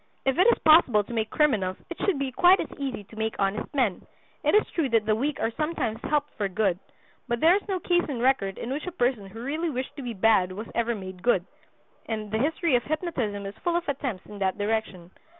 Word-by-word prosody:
If 270 Hz, +4 st, +1 dB
it 370 Hz, -, +6 dB
is 475 Hz, -, +5 dB
possible 310 Hz, -10 st, +6 dB
to 235 Hz, -, -9 dB
make 220 Hz, -1 st, -1 dB
criminals 210 Hz, -12 st, +1 dB
it 345 Hz, -, -5 dB
should 395 Hz, -7 st, +2 dB
be 275 Hz, -1 st, -2 dB
quite 360 Hz, +8 st, +5 dB
as -, -, -4 dB
easy 265 Hz, -7 st, -3 dB
to 210 Hz, -, -16 dB
make 220 Hz, 0 st, -2 dB
honest 195 Hz, +2 st, -1 dB
men. 235 Hz, -9 st, +1 dB, 0.4 s
It -, -, +3 dB
is 425 Hz, -, +5 dB
true 315 Hz, -6 st, 0 dB
that 225 Hz, -2 st, +2 dB
the 215 Hz, 0 st, +2 dB
weak 280 Hz, +6 st, -2 dB
are 225 Hz, -, 0 dB
sometimes 280 Hz, -6 st, -2 dB
helped 295 Hz, 0 st, 0 dB
for 205 Hz, -, 0 dB
good; 190 Hz, -2 st, 0 dB, 0.5 s
but 240 Hz, 0 st, -1 dB
there 330 Hz, +6 st, +6 dB
is 410 Hz, -, 0 dB
no 380 Hz, -2 st, -1 dB
case 350 Hz, -1 st, +1 dB
on 260 Hz, -5 st, -3 dB
record 235 Hz, -6 st, +1 dB
in 240 Hz, -, -5 dB
which 295 Hz, +6 st, -4 dB
a -, -, -2 dB
person 245 Hz, -, 0 dB
who 225 Hz, +4 st, -9 dB
really 310 Hz, +6 st, -2 dB
wished 260 Hz, -2 st, -4 dB
to -, -, -5 dB
be 240 Hz, -3 st, -5 dB
bad 190 Hz, -3 st, +3 dB
was 210 Hz, +4 st, -6 dB
ever 235 Hz, 0 st, 0 dB
made 185 Hz, -3 st, -8 dB
good; 195 Hz, -5 st, +2 dB, 0.6 s
and 215 Hz, -2 st, -4 dB
the 220 Hz, -, 0 dB
history 320 Hz, +3 st, +1 dB
of 240 Hz, -, +2 dB
hypnotism 260 Hz, -, -2 dB
is 195 Hz, -, -5 dB
full 345 Hz, -1 st, +1 dB
of 345 Hz, 0 st, -1 dB
attempts 260 Hz, -9 st, -3 dB
in 205 Hz, -, -10 dB
that 190 Hz, 0 st, 0 dB
direction. 205 Hz, -4 st, -2 dB
240 Hz, 240 wpm, -26 LUFS, 210-300 Hz, 0.6 s, it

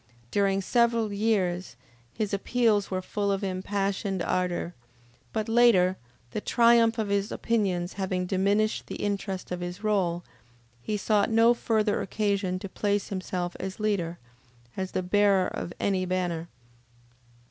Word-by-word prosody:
During 195 Hz, -1 st, +2 dB
several 230 Hz, 0 st, +2 dB
years 190 Hz, -, 0 dB, 0.4 s
his 210 Hz, -, -3 dB
appeals 210 Hz, 0 st, +1 dB
were 185 Hz, -1 st, -2 dB
full 200 Hz, +1 st, -1 dB
of 195 Hz, 0 st, -1 dB
impassioned 195 Hz, 0 st, -1 dB
ardor, 180 Hz, -1 st, -1 dB, 0.6 s
but 215 Hz, -1 st, -2 dB
later, 225 Hz, -6 st, +5 dB, 0.4 s
the 215 Hz, -, -3 dB
triumph 235 Hz, 0 st, +4 dB
of 215 Hz, -2 st, -1 dB
his 200 Hz, 0 st, 0 dB
opinions 190 Hz, -6 st, 0 dB
having 185 Hz, -2 st, -2 dB
diminished 200 Hz, +3 st, +1 dB
the -, -, -6 dB
interest 195 Hz, -2 st, -3 dB
of 180 Hz, -, -2 dB
his 175 Hz, +3 st, -6 dB
role, 180 Hz, -5 st, +1 dB, 0.6 s
he 210 Hz, -, -2 dB
sought 210 Hz, 0 st, +2 dB
no 225 Hz, +1 st, +5 dB
further 220 Hz, -3 st, 0 dB
occasion 200 Hz, -3 st, -1 dB
to 195 Hz, -, -6 dB
place 205 Hz, +1 st, -1 dB
himself 180 Hz, -2 st, -3 dB
as 190 Hz, +1 st, -5 dB
leader, 190 Hz, -6 st, -1 dB, 0.6 s
as 190 Hz, -1 st, -4 dB
the 185 Hz, -, -1 dB
bearer 195 Hz, 0 st, +3 dB
of -, -, -5 dB
any 190 Hz, -2 st, +1 dB
banner. 175 Hz, -2 st, -1 dB
200 Hz, 135 wpm, -27 LUFS, 185-215 Hz, 0.6 s, later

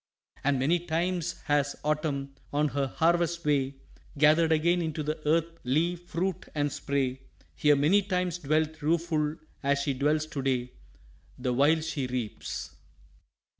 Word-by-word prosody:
And 140 Hz, -1 st, +2 dB
many 150 Hz, +7 st, +2 dB
times 175 Hz, +1 st, -2 dB
has 145 Hz, -1 st, +1 dB
Autumn, 145 Hz, -2 st, -1 dB, 0.2 s
on 150 Hz, +1 st, +2 dB
her 140 Hz, -1 st, -1 dB
harvest 170 Hz, +2 st, +1 dB
way, 140 Hz, -2 st, +1 dB, 0.4 s
Gathered 155 Hz, +2 st, +5 dB
again 170 Hz, +3 st, +3 dB
into 160 Hz, -1 st, -2 dB
the 155 Hz, +1 st, -2 dB
earth 165 Hz, +1 st, +1 dB
leaf, 170 Hz, +7 st, 0 dB
fruit, 185 Hz, +2 st, -2 dB
and 145 Hz, -1 st, 0 dB
spray; 135 Hz, -2 st, -1 dB, 0.3 s
Here 150 Hz, -1 st, +4 dB
many 155 Hz, +9 st, +4 dB
times 180 Hz, -3 st, -1 dB
dwelt 155 Hz, +1 st, 0 dB
rueful 155 Hz, -1 st, +1 dB, 0.3 s
as 140 Hz, 0 st, +2 dB
she 140 Hz, -, 0 dB
dwells 150 Hz, +3 st, +1 dB
to 150 Hz, -3 st, -5 dB
day, 125 Hz, -2 st, 0 dB, 0.7 s
The 125 Hz, -1 st, -1 dB
while 150 Hz, +5 st, +4 dB
she 155 Hz, -4 st, -2 dB
reaps. 120 Hz, -4 st, -4 dB
155 Hz, 140 wpm, -28 LUFS, 140-170 Hz, 0.7 s, Gathered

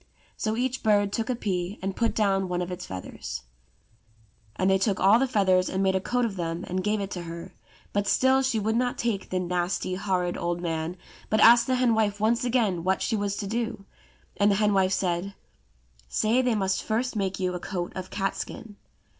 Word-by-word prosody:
So 220 Hz, 0 st, -2 dB
each 255 Hz, +1 st, -1 dB
bird 205 Hz, -2 st, +2 dB
took 225 Hz, +2 st, -2 dB
a 250 Hz, -, +1 dB
pea 190 Hz, -3 st, -2 dB
and 190 Hz, 0 st, -3 dB
put 230 Hz, -1 st, 0 dB
down 195 Hz, -3 st, +1 dB
one 180 Hz, 0 st, -1 dB
of 175 Hz, -, -6 dB
its 180 Hz, 0 st, -6 dB
feathers: 60 Hz, -9 st, -6 dB, 1.1 s
and 185 Hz, -, 0 dB
they 190 Hz, 0 st, +4 dB
took 195 Hz, 0 st, +1 dB
all 200 Hz, +4 st, +6 dB
the 270 Hz, -, +2 dB
feathers 190 Hz, -6 st, +2 dB
and 190 Hz, +1 st, -1 dB
made 190 Hz, 0 st, +3 dB
a 190 Hz, -, 0 dB
coat 245 Hz, +5 st, 0 dB
of 205 Hz, -4 st, -4 dB
them 165 Hz, 0 st, -3 dB
and 185 Hz, +1 st, -2 dB
gave 210 Hz, +1 st, +1 dB
it 195 Hz, -1 st, -4 dB
to 180 Hz, -, -4 dB
her; 170 Hz, +2 st, -8 dB, 0.4 s
but 205 Hz, 0 st, 0 dB
still 260 Hz, +6 st, +4 dB
she 260 Hz, -3 st, 0 dB
would 220 Hz, +2 st, 0 dB
not 245 Hz, +1 st, 0 dB
take 220 Hz, -5 st, -2 dB
the 185 Hz, -, 0 dB
nasty, 180 Hz, +1 st, -1 dB
horrid, 185 Hz, -2 st, -1 dB
old 175 Hz, 0 st, -2 dB
man, 165 Hz, 0 st, -3 dB, 0.3 s
but 215 Hz, -, +2 dB
asked 235 Hz, +2 st, +7 dB
the 260 Hz, -, +2 dB
hen 250 Hz, -2 st, +3 dB
wife 210 Hz, -2 st, +1 dB
once 225 Hz, +3 st, +2 dB
again 225 Hz, -9 st, +1 dB
what 190 Hz, +1 st, +1 dB
she 225 Hz, -, 0 dB
was 200 Hz, -1 st, -1 dB
to 205 Hz, -, -4 dB
do, 225 Hz, -1 st, -3 dB, 0.5 s
and 205 Hz, 0 st, +4 dB
the 200 Hz, -, +3 dB
hen 210 Hz, 0 st, +2 dB
wife 190 Hz, -1 st, +3 dB
said, 185 Hz, +1 st, -1 dB, 0.7 s
"Say 220 Hz, -, +2 dB
they 250 Hz, -3 st, +1 dB
must 190 Hz, -2 st, 0 dB
first 240 Hz, +3 st, -1 dB
make 195 Hz, -2 st, -1 dB
you 185 Hz, -1 st, 0 dB
a 180 Hz, -, -3 dB
coat 175 Hz, -1 st, -4 dB
of 185 Hz, -1 st, -6 dB
catskin." 205 Hz, +2 st, -4 dB
195 Hz, 215 wpm, -26 LUFS, 185-220 Hz, 1.1 s, asked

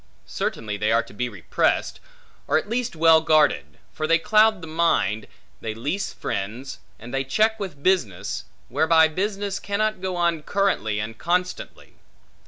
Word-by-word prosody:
Certainly 105 Hz, -2 st, -3 dB
they 105 Hz, +2 st, 0 dB
are 115 Hz, +1 st, +3 dB
to -, -, -15 dB
be 125 Hz, +4 st, -2 dB
repressed, 90 Hz, -6 st, -1 dB, 0.5 s
or -, -, +3 dB
at 160 Hz, -, -2 dB
least 235 Hz, -2 st, -2 dB
well 160 Hz, 0 st, +6 dB
guarded: 155 Hz, -3 st, +2 dB, 0.2 s
for 155 Hz, -, -2 dB
they 165 Hz, -, +5 dB
cloud 215 Hz, +2 st, +3 dB
the -, -, -7 dB
mind; 155 Hz, -, +1 dB, 0.3 s
they 110 Hz, -1 st, -5 dB
leese 145 Hz, -, -3 dB
friends; 115 Hz, +8 st, -5 dB, 0.2 s
and 120 Hz, +3 st, -11 dB
they 135 Hz, 0 st, 0 dB
check 220 Hz, +11 st, +1 dB
with 180 Hz, -8 st, -6 dB
business, 105 Hz, -, 0 dB, 0.2 s
whereby 160 Hz, 0 st, +4 dB
business 200 Hz, +4 st, -2 dB
cannot 215 Hz, 0 st, -1 dB
go 185 Hz, -1 st, -2 dB
on 170 Hz, -2 st, +1 dB
currently 150 Hz, -, 0 dB
and 110 Hz, +1 st, -5 dB
constantly. 180 Hz, +1 st, -2 dB
160 Hz, 155 wpm, -24 LUFS, -, 0.5 s, well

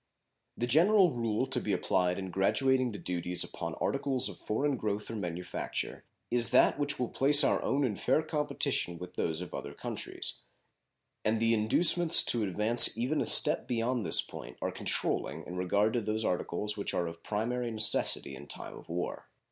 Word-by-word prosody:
The 120 Hz, -, -2 dB
general 175 Hz, -, +4 dB
rule 115 Hz, -1 st, -2 dB
to -, -, -2 dB
be 105 Hz, -, -3 dB
applied 90 Hz, -2 st, -1 dB
in 95 Hz, -1 st, -6 dB
graduating 130 Hz, +7 st, +1 dB
the 105 Hz, -, -8 dB
duties 90 Hz, -1 st, 0 dB
upon -, -, -7 dB
articles 130 Hz, -3 st, -1 dB
of -, -, -11 dB
foreign 140 Hz, +6 st, -2 dB
growth 105 Hz, -2 st, -4 dB
or -, -, -6 dB
manufacture 90 Hz, -3 st, -5 dB, 0.3 s
is 120 Hz, -1 st, +5 dB
that 125 Hz, +3 st, +3 dB
which 145 Hz, 0 st, -2 dB
will 125 Hz, -, -2 dB
place 145 Hz, +2 st, +3 dB
our -, -, +1 dB
own 140 Hz, +1 st, -1 dB
in 115 Hz, -6 st, -1 dB
fair 135 Hz, +10 st, 0 dB
competition 150 Hz, -, -2 dB
with 90 Hz, +1 st, -10 dB
those 80 Hz, 0 st, -3 dB
of 90 Hz, -, -9 dB
other -, -, -7 dB
countries; -, -, -3 dB, 0.8 s
and 110 Hz, +1 st, 0 dB
the 115 Hz, 0 st, +2 dB
inducements 165 Hz, +10 st, +6 dB
to 120 Hz, -, +2 dB
advance 105 Hz, +3 st, +3 dB
even 130 Hz, +7 st, -1 dB
a -, -, -2 dB
step 150 Hz, -, +6 dB
beyond 120 Hz, 0 st, -2 dB
this 80 Hz, -, +2 dB
point 60 Hz, -, -11 dB
are -, -, -3 dB
controlling 75 Hz, +4 st, -3 dB
in 90 Hz, -, -9 dB
regard 100 Hz, +4 st, 0 dB
to 120 Hz, -, -1 dB
those 110 Hz, +1 st, 0 dB
articles 90 Hz, +3 st, -2 dB
which 100 Hz, -, -4 dB
are 85 Hz, -, -1 dB
of 85 Hz, 0 st, -9 dB
primary 120 Hz, +5 st, -3 dB
necessity 110 Hz, -9 st, +3 dB
in 70 Hz, +2 st, -12 dB
time -, -, -8 dB
of -, -, -15 dB
war. 90 Hz, +1 st, -5 dB
110 Hz, 180 wpm, -29 LUFS, 90-130 Hz, 0.8 s, inducements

